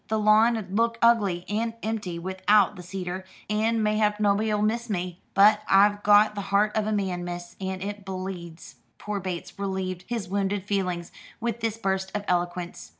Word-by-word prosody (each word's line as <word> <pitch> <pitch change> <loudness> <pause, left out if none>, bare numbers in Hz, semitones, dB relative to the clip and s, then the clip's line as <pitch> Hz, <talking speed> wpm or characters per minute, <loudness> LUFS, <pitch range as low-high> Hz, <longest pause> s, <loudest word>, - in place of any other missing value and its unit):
The 220 - 0
lawn 215 +2 +4
'ud 195 -3 -7
look 230 +2 +1
ugly 205 -7 +3
and 225 +3 -2
empty 210 -6 -3
without 190 +3 +2
the 180 - -9
cedar, 185 0 -5 0.2
and 220 +1 +1
mayhap 210 0 +1
nobody'll 210 +1 +2
miss 235 +2 -1
me 180 -2 -3
but 210 +2 +6
I've 205 +1 +5
got 210 +1 +5
the 205 - -4
heart 205 +2 +2
of 215 -1 0
a - - 0
man, 190 -4 -1
miss, 175 0 -6
and 190 0 -3
it 205 0 -5
bleeds." 185 -3 -7 0.2
Poor 210 -1 -4
Bates 185 0 -6
relieved 190 -2 -3
his 230 -6 -3
wounded 195 0 -1
feelings 185 -4 -2 0.3
with 235 0 -2
this 225 -1 -2
burst 190 -3 -1
of 205 -1 -3
eloquence. 175 - -2
200 Hz, 175 wpm, -26 LUFS, 185-215 Hz, 0.3 s, but